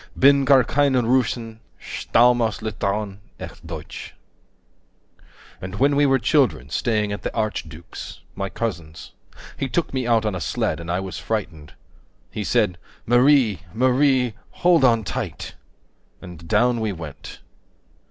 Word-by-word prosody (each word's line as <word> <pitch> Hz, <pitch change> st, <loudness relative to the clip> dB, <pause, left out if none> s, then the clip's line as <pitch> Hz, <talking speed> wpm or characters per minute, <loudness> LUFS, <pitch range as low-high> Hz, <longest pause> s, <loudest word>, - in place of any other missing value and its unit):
Bin 140 Hz, 0 st, +5 dB
gar 130 Hz, -1 st, +6 dB
keine 135 Hz, -1 st, +2 dB
Russin, 115 Hz, -2 st, 0 dB, 0.2 s
stamm' 120 Hz, +1 st, +2 dB
aus 110 Hz, -2 st, -1 dB
Litauen, 105 Hz, -2 st, -2 dB, 0.2 s
echt 85 Hz, -, -10 dB
deutsch. 80 Hz, -2 st, -8 dB, 1.5 s
And 90 Hz, +1 st, -6 dB
when 140 Hz, +6 st, +2 dB
we 145 Hz, 0 st, +4 dB
were 135 Hz, 0 st, +4 dB
children, 120 Hz, -, +1 dB
staying 105 Hz, +3 st, 0 dB
at 100 Hz, -, -4 dB
the -, -, -3 dB
archduke's, 85 Hz, -6 st, -5 dB
My 100 Hz, 0 st, -4 dB
cousin's, 85 Hz, -9 st, -5 dB, 0.5 s
he 135 Hz, -, -2 dB
took 170 Hz, +3 st, -1 dB
me 130 Hz, -2 st, -1 dB
out 115 Hz, -2 st, +2 dB
on 105 Hz, -, 0 dB
a 90 Hz, -, -4 dB
sled, -, -, -1 dB
And 85 Hz, 0 st, -8 dB
I 90 Hz, +2 st, 0 dB
was 95 Hz, -1 st, -6 dB
frightened. 90 Hz, -9 st, -4 dB, 0.6 s
He -, -, -4 dB
said, 90 Hz, -1 st, +1 dB, 0.3 s
Marie, 120 Hz, -3 st, +4 dB
15 90 Hz, +2 st, -23 dB
Marie, 130 Hz, -1 st, +3 dB, 0.2 s
hold 175 Hz, -4 st, +3 dB
on 115 Hz, -3 st, +4 dB
tight. 90 Hz, -, -5 dB, 0.7 s
And 85 Hz, -2 st, -11 dB
down 120 Hz, +5 st, +2 dB
we 110 Hz, -2 st, -1 dB
went. 80 Hz, -6 st, -9 dB
110 Hz, 140 wpm, -22 LUFS, 95-130 Hz, 1.5 s, gar